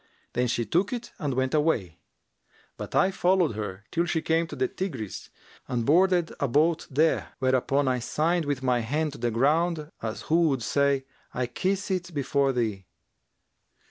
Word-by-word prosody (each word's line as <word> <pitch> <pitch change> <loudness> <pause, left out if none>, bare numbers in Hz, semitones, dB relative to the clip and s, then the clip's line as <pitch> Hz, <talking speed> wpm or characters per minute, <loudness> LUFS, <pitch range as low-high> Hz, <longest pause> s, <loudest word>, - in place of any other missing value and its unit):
Then 125 +1 +1
she 120 0 0
took 180 - +1
it 240 -1 -5
and 145 -6 -2
went 130 0 0
away; 115 - +1 0.8
but - - -7
I 190 - +4
followed 180 -5 +2
her, 105 -2 -5
till 170 +1 +1
she 165 -2 -1
came 165 +1 +1
to - - -7
the 390 - +1
Tigris 140 - -5 0.4
and 120 -2 -1
boarded 175 +3 +3
a 140 - +1
boat 155 +6 +2
there, 155 +3 +1
whereupon 130 +2 +1
I 130 -1 +1
signed 160 +7 0
with 140 -2 -2
my 125 -2 +2
hand 150 +7 -1
to 145 - -10
the 120 0 0
ground, 155 +6 +1
as 110 -1 -4
who 165 -2 +3
should 125 - -6
say, 140 +1 +1 0.3
'I 125 - 0
kiss 190 - -2
it 175 -3 -3
before 140 0 +1
thee.' 110 -7 -2
145 Hz, 175 wpm, -27 LUFS, 125-170 Hz, 0.8 s, I